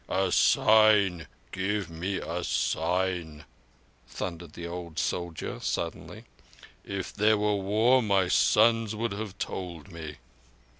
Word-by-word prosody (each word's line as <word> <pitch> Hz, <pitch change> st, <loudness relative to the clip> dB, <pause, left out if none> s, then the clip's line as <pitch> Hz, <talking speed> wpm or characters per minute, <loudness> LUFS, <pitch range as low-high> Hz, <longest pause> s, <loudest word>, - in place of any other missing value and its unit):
"A -, -, 0 dB
sign. 105 Hz, -6 st, +4 dB, 0.2 s
Give 95 Hz, -1 st, -2 dB
me 90 Hz, +4 st, -3 dB
a 85 Hz, +1 st, -4 dB
sign," 90 Hz, -5 st, -1 dB, 0.6 s
thundered 85 Hz, -3 st, -6 dB
the 85 Hz, -, -7 dB
old 85 Hz, -1 st, -7 dB
soldier 85 Hz, 0 st, -3 dB
suddenly. -, -, -4 dB, 0.6 s
"If 100 Hz, -2 st, -5 dB
there 105 Hz, +1 st, +3 dB
were 105 Hz, 0 st, +1 dB
war 110 Hz, +6 st, +3 dB
my 100 Hz, -4 st, +2 dB
sons 115 Hz, +3 st, +3 dB
would 115 Hz, +1 st, -2 dB
have 100 Hz, -1 st, -6 dB
told 90 Hz, -1 st, -6 dB
me." 80 Hz, -3 st, -8 dB
95 Hz, 115 wpm, -28 LUFS, 85-105 Hz, 0.6 s, sign